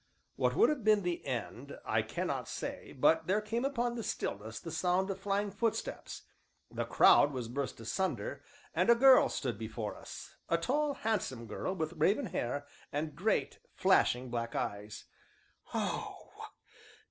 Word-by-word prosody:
What - - +1
would 445 - +5
have 295 -6 -1
been 215 -1 +4
the 175 -1 -2
end 120 +2 -4
I - - +2
cannot - - -3
say, - - -5
but 160 +4 +3
there 195 +3 +3
came 225 +3 -2
upon 245 -3 0
the 235 - -4
stillness 110 - -4
the 165 - -7
sound 180 +4 +1
of 195 - -5
flying 200 +1 0
footsteps, 230 +1 -3 0.5
the - - -2
crowd 145 - +6
was 125 -4 -4
burst 130 0 -4
asunder, 190 - -2 0.3
and - - +2
a 235 - +8
girl 260 +2 +7
stood 120 -7 -3
before 110 -1 -4
us, - - -10
a 170 - +3
tall, 285 - 0
handsome 185 - -2
girl 185 - -3
with 160 -2 -2
raven 190 - +2
hair, 140 +4 -2 0.3
and 150 0 -3
great, 200 +8 0 0.2
flashing 125 0 +3
black 115 -1 -3
eyes. 105 +2 -4 0.7
"Oh! - - -3
165 Hz, 155 wpm, -33 LUFS, -, 0.7 s, a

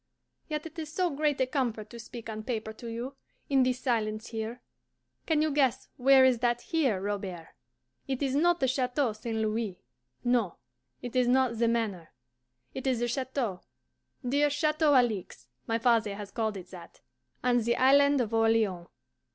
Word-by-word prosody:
Yet 305 0 -3
it 325 +1 -8
is 310 -2 -5
so 360 +1 0
great 295 0 0
a - - +4
comfort 240 -6 -2
to 235 - -9
speak 230 0 -9
on 215 -1 -5
paper 220 -2 -4
to 235 +2 -10
you, 240 +4 -5 0.4
in 270 -1 +5
this 255 0 +1
silence 220 -2 -1
here. 225 +1 -4 0.7
Can 310 -2 +3
you 310 - +1
guess 265 -3 +1
where 265 +1 +6
is 255 -3 +3
that 240 0 +1
HERE, 270 - 0
Robert? 195 -4 -4 0.6
It 270 0 -2
is 265 -2 0
not 345 +4 +3
the 265 - +2
Chateau 255 -1 0
St. 220 +1 -4
Louis 215 -3 -1 0.5
no. 240 -7 +1 0.5
It 245 0 -6
is 250 -1 +3
not 250 -2 +2
the 235 - +3
Manor. 215 -8 -1 0.6
It 265 0 -4
is 255 -2 +2
the 240 +1 0
chateau, 250 -6 -2 0.7
dear 290 +3 +3
Chateau 305 0 +2
Alixe 220 - 0 0.2
my 225 - +1
father 230 -3 +2
has 205 -1 -8
called 220 -3 -2
it 180 -1 -10
that 180 -2 -12 0.4
on 245 -1 +3
the 235 +1 +1
Island 280 +1 +5
of 230 -2 -3
Orleans. 225 -6 +2
240 Hz, 175 wpm, -29 LUFS, 220-270 Hz, 0.7 s, where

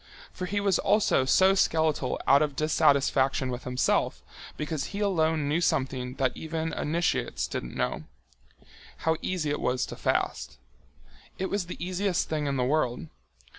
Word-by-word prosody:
For 185 - -5
he 205 +3 -1
was 200 -2 +2
also 200 -9 +2
so 190 +8 +5
skeletal 160 -8 +1
out 140 +1 +5
of 150 -2 0
dissatisfaction 135 -3 +2
with 125 +1 -6
himself, 125 0 0 0.3
because 150 -2 -3
he 200 - -6
alone 160 -7 +1
knew 155 +4 +1
something 130 -6 -1
that 130 -2 0
even 160 0 -4
initiates 165 +2 -1
didn't - - -5
know—how 155 - -5
easy 170 -6 -2
it 145 - -2
was 125 0 0
to - - -8
fast. - - -1 0.8
It 190 - -3
was 200 -3 -1
the 180 - -7
easiest 185 +1 -1
thing 150 -2 -1
in 140 -1 -1
the 125 - +1
world. 125 - 0
155 Hz, 150 wpm, -27 LUFS, 135-175 Hz, 0.8 s, so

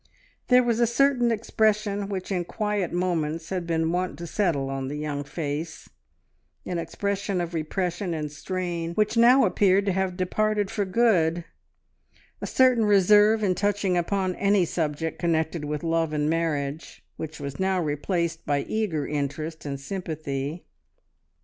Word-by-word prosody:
There 250 0 +6
was 235 -1 +1
a 235 - +4
certain 245 0 +3
expression 210 -2 0
which 190 -1 -4
in 180 -2 0
quiet 210 -1 -2
moments 165 -3 -1
had 180 -3 -2
been 165 -1 0
wont 180 +1 -2
to 170 - -6
settle 165 -6 0
on 135 -1 -3
the 145 +2 -4
young 150 -1 -3
face, 150 +1 -5 0.8
an 175 -2 -2
expression 200 +3 -2
of 175 0 -3
repression 175 +3 -2
and 150 -2 -4
strain, 170 +1 -4
which 215 +1 +1
now 240 +3 +6
appeared 195 0 +3
to 200 - +2
have 185 -1 -1
departed 210 +2 0
for 210 -3 -1
good, 180 -6 +2 1.0
a - - -3
certain 255 -4 +4
reserve 210 +2 +5
in 190 -3 +3
touching 200 0 0
upon 185 +1 0
any 200 -2 +3
subject 160 -1 -2
connected 160 -2 0
with 150 0 -3
love 165 -1 0
and 150 -1 0
marriage, 155 -2 -2
which 160 0 -6
was 140 -1 -6
now 190 0 +1
replaced 165 +2 -1
by 145 -1 0
eager 200 -10 -1
interest 150 +2 -4
and 140 -1 -4
sympathy. 155 -2 -4
175 Hz, 150 wpm, -25 LUFS, 155-205 Hz, 1.0 s, There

